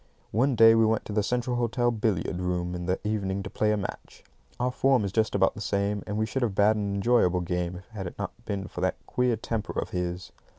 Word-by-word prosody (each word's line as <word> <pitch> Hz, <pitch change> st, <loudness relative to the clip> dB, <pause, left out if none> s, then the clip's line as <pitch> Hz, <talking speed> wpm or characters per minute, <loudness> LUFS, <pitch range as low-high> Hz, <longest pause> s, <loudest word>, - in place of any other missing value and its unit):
One 130 Hz, +5 st, +2 dB
day 115 Hz, 0 st, +8 dB
we 115 Hz, 0 st, +4 dB
went 110 Hz, 0 st, +1 dB
to 105 Hz, -, -6 dB
the 105 Hz, -, +2 dB
Central 120 Hz, +3 st, -1 dB
Hotel 120 Hz, 0 st, +1 dB
billiard 105 Hz, -6 st, -1 dB
room 90 Hz, -1 st, -1 dB
in 90 Hz, -1 st, -5 dB
the 90 Hz, -, 0 dB
evening 100 Hz, -2 st, -1 dB
to -, -, -7 dB
play 105 Hz, 0 st, +1 dB
a 105 Hz, -, +1 dB
match. 100 Hz, -, -7 dB, 0.4 s
Our 125 Hz, +1 st, +1 dB
form 130 Hz, -4 st, +2 dB
is 100 Hz, -, -3 dB
just 110 Hz, +1 st, +1 dB
about 95 Hz, -1 st, +3 dB
the 110 Hz, -, -8 dB
same, 100 Hz, 0 st, 0 dB
and 105 Hz, -, -3 dB
we 110 Hz, -, +1 dB
should 130 Hz, +5 st, -3 dB
have 110 Hz, -6 st, 0 dB
bad 105 Hz, +2 st, +4 dB
an 100 Hz, -2 st, -2 dB
enjoyable 100 Hz, -4 st, +3 dB
game 90 Hz, 0 st, -2 dB
if 90 Hz, -, -9 dB
it 95 Hz, -3 st, -4 dB
had 90 Hz, -, -7 dB
not -, -, -3 dB
been 100 Hz, -1 st, -3 dB
for 90 Hz, -, -7 dB
that 95 Hz, 0 st, +1 dB
queer 125 Hz, -1 st, +1 dB
temper 110 Hz, -1 st, -3 dB
of -, -, -4 dB
his. 90 Hz, 0 st, -3 dB
105 Hz, 245 wpm, -27 LUFS, 95-115 Hz, 0.4 s, day